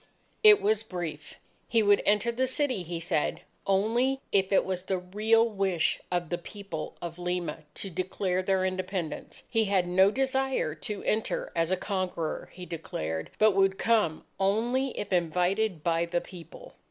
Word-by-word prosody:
It 425 -2 +8
was 215 +1 +2
brief. 175 -8 -6 0.3
He 230 -2 +3
would 205 -1 +5
enter 210 +3 +3
the 260 +3 0
city, 260 -5 0
he 170 -1 -5
said, 165 -2 0 0.3
only 230 +7 +2
if 195 -1 +2
it 195 - +4
was 185 -1 -2
the 190 - 0
real 215 +5 +2
wish 195 -6 0
of 175 -2 -1
the 175 - -2
People 195 -3 -7
of 170 0 -6
Lima 175 -3 -2 0.2
to 195 - -5
declare 185 +1 -1
their 185 0 +1
Independence. 185 -3 -4
He 225 -2 +1
had 195 -3 +2
no 190 +2 +5
desire 265 - 0
to 200 +6 -6
enter 215 +1 -1
as 165 0 +1
a 185 - +1
conqueror, 185 -5 -3
he 180 0 -9
declared, 80 - -4
but 215 0 +5
would 195 0 +2
come 215 -9 +1
only 240 +7 +1
if 205 -2 -3
invited 180 +1 +1
by 170 0 +2
the 175 0 0
People. 170 -3 -12
190 Hz, 165 wpm, -28 LUFS, 175-215 Hz, 0.3 s, It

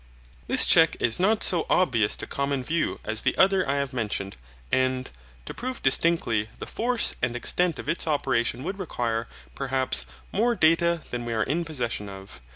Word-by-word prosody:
This - - +7
check - - +5
is 115 +4 0
not 210 +4 +2
so 175 -3 +3
obvious 120 - +2
to - - -7
common 140 -1 -2
view 165 +5 -2
as 110 0 0
the 130 - 0
other 190 -3 +3
I 140 - +1
have 140 -2 -2
mentioned, 105 -5 -3 0.4
and, 130 0 0 0.4
to - - -7
prove 255 0 -6
distinctly 130 -7 +1
the - - -7
force 245 +1 +1
and 120 0 -1
extent 170 +6 +1
of - - -8
its 165 - -1
operation 130 -4 0
would 190 +4 -5
require, 115 -10 -3 0.3
perhaps, 130 -1 +1 0.2
more 235 +4 +1
data 170 -1 +2
than 120 -1 -4
we 120 -1 -4
are 110 -1 0
in 165 +8 -2
possession 120 -9 -3
of. 95 -8 -11
135 Hz, 175 wpm, -25 LUFS, 120-170 Hz, 0.4 s, This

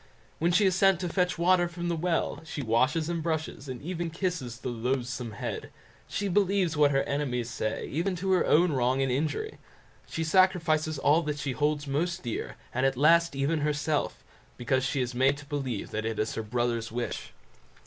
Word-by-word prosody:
When 170 +2 +2
she 180 +4 +4
is 190 - +4
sent 195 -1 +4
to 180 - -2
fetch 180 +1 0
water 175 +1 +4
from 175 0 -5
the 170 - 0
well, 165 +1 -1
she 155 -3 -5
washes 130 +8 +2
and 170 -1 -2
brushes, 155 -3 -3
and 130 0 -6
even 170 0 -3
kisses, 165 -8 -3
the - - -3
loathsome 125 0 -2
head; 100 - -5 0.4
she 200 - -2
believes 195 -3 +2
what 150 -1 +5
her 135 -1 +2
enemies 125 -5 -2
say, 110 -4 -2
even 175 +6 -1
to 190 +2 -1
her 185 - +4
own 170 +2 +4
wrong 130 0 +1
and 135 - 0
injury; 155 - -2 0.5
she 165 - -3
sacrifices 160 -3 +3
all 150 +4 +4
that 150 -2 -3
she 145 -2 -2
holds 150 +2 0
most 170 +6 -1
dear, 120 -3 -4 0.2
and 130 - 0
at 135 -1 +2
last 170 +2 +4
even 140 +4 +1
herself, 150 0 -1 0.3
because 130 +2 0
she 135 0 0
is 125 0 -2
made 135 +3 +3
to 145 - -11
believe 135 -7 -3
that 110 0 -3
it 110 -1 -3
is 110 - -1
her - - -3
brother's 115 0 -1
wish. 120 +1 -4
150 Hz, 195 wpm, -28 LUFS, 130-170 Hz, 0.5 s, what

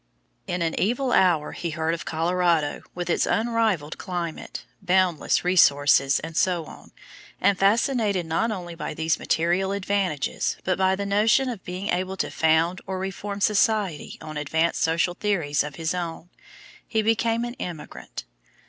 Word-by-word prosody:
In 180 -2 -1
an 165 -1 0
evil 245 +5 0
hour 170 -8 +3
he 170 - -4
heard 160 +1 -1
of 170 - -5
Colorado 170 -1 +1
with 175 -1 -4
its 175 - +1
"unrivalled 220 -9 0
climate, 175 -3 -5 0.2
boundless 180 -4 +2
resources," 145 -6 +4
etc., 165 +1 -2 0.5
and, 200 - +3
fascinated 205 -2 +2
not 165 +8 0
only 180 -5 -5
by 165 - -5
these 160 0 0
material 175 +4 +1
advantages, 195 -7 -1
but 185 0 0
by 190 0 +3
the 200 +1 -4
notion 215 +6 +3
of 225 -6 -6
being 185 +3 -5
able 185 +2 -1
to - - -2
found 160 +3 +2
or 190 - -3
reform 195 +2 -5
society 210 - +1
on 155 -1 -7
advanced 160 +3 0
social 165 +2 +1
theories 175 -7 0
of 145 -1 -7
his 165 +2 -2
own, 175 -1 -5 0.6
he 220 -1 0
became 225 +1 +1
an 240 - -5
emigrant. 170 -4 -7
180 Hz, 150 wpm, -24 LUFS, 165-200 Hz, 0.6 s, resources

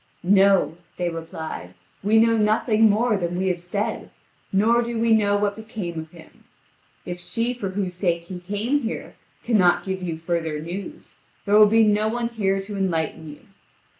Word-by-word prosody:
"No," 195 -2 +4 0.2
they 175 -1 -1
replied; 160 - -7 0.3
"we 215 +3 +3
know 230 +1 +5
nothing 215 +1 +3
more 215 +1 +2
than 175 -1 -2
we 190 +1 0
have 180 -1 -2
said, 200 +4 -3 0.4
nor 225 +5 +3
do 235 0 -3
we 225 0 +3
know 205 -2 +3
what 205 0 0
became 215 -6 -6
of 160 0 -8
him. 165 -1 -17 0.6
If 175 0 -5
she 230 +6 -2
for 210 -6 -4
whose 190 -1 -3
sake 175 -2 -1
he 180 +1 -8
came 205 +10 -1
here, 235 -4 -5 0.3
cannot 190 -7 +3
give 190 -1 -3
you 170 -3 -3
further 165 -2 -2
news, 175 +6 -8 0.3
there 205 - 0
will 210 0 +8
be 225 +2 +4
no 210 0 +2
one 235 +1 -1
here 195 -4 0
to 205 +1 -7
enlighten 165 -4 -2
you. 150 - -11
195 Hz, 175 wpm, -23 LUFS, 175-220 Hz, 0.6 s, will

